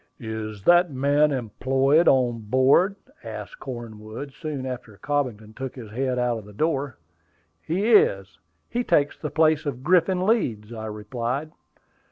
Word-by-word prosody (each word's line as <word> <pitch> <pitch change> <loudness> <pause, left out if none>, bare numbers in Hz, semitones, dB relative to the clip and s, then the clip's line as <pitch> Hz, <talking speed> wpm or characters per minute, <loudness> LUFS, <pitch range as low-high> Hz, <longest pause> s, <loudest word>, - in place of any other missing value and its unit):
"Is 110 -2 -6
that 175 - +5
man 145 +3 +2
employed 135 +5 +2
on 125 -3 +3
board?" 130 - +3 0.3
asked 110 -2 -8
Cornwood, 120 +1 -7
soon 150 -4 -5
after 125 -5 -7
Cobbington 125 -7 -2
took 130 -1 -6
his 115 -5 -9
head 130 +2 -1
out 120 -2 0
of 105 - -13
the 105 - -13
door. 140 +1 -1 0.6
"He 195 - 0
is; 95 - +3 0.3
he 245 +1 -2
takes 145 -10 +2
the 150 - -3
place 155 -1 +2
of 130 -2 -4
Griffin 180 +2 +3
Leeds," 120 - 0
I 110 -1 -6
replied. 120 +7 -4
130 Hz, 145 wpm, -24 LUFS, 110-150 Hz, 0.6 s, that